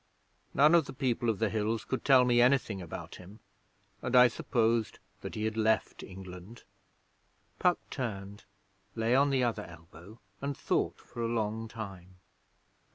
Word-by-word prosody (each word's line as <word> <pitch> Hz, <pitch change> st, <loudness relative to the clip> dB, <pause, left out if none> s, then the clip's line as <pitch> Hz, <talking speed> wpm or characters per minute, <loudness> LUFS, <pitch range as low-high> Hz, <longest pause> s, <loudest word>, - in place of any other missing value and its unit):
None 150 Hz, +4 st, +6 dB
of 170 Hz, -3 st, +5 dB
the -, -, -8 dB
People 125 Hz, -3 st, 0 dB
of 110 Hz, -, 0 dB
the 110 Hz, -1 st, 0 dB
Hills 110 Hz, +1 st, -1 dB
could 130 Hz, -, -3 dB
tell 130 Hz, -3 st, +6 dB
me 120 Hz, -1 st, +4 dB
anything 125 Hz, -6 st, +2 dB
about 85 Hz, -, -8 dB
him, 95 Hz, +5 st, -13 dB, 0.6 s
and 125 Hz, 0 st, -1 dB
I 125 Hz, 0 st, +8 dB
supposed 115 Hz, -1 st, 0 dB, 0.2 s
that -, -, -7 dB
he 105 Hz, -, -3 dB
had 110 Hz, 0 st, -1 dB
left 110 Hz, 0 st, +1 dB
England.' 95 Hz, +3 st, -10 dB, 1.0 s
Puck 180 Hz, -1 st, +3 dB
turned; 100 Hz, -6 st, -5 dB, 0.5 s
lay 115 Hz, +1 st, +1 dB
on 140 Hz, +2 st, +4 dB
the 135 Hz, -2 st, +2 dB
other 115 Hz, -3 st, -1 dB
elbow, 85 Hz, +4 st, -14 dB, 0.2 s
and 140 Hz, 0 st, -3 dB
thought -, -, 0 dB
for 120 Hz, -, -9 dB
a 115 Hz, -, 0 dB
long 110 Hz, -1 st, -2 dB
time. 95 Hz, -5 st, -9 dB
115 Hz, 160 wpm, -30 LUFS, 100-125 Hz, 1.0 s, I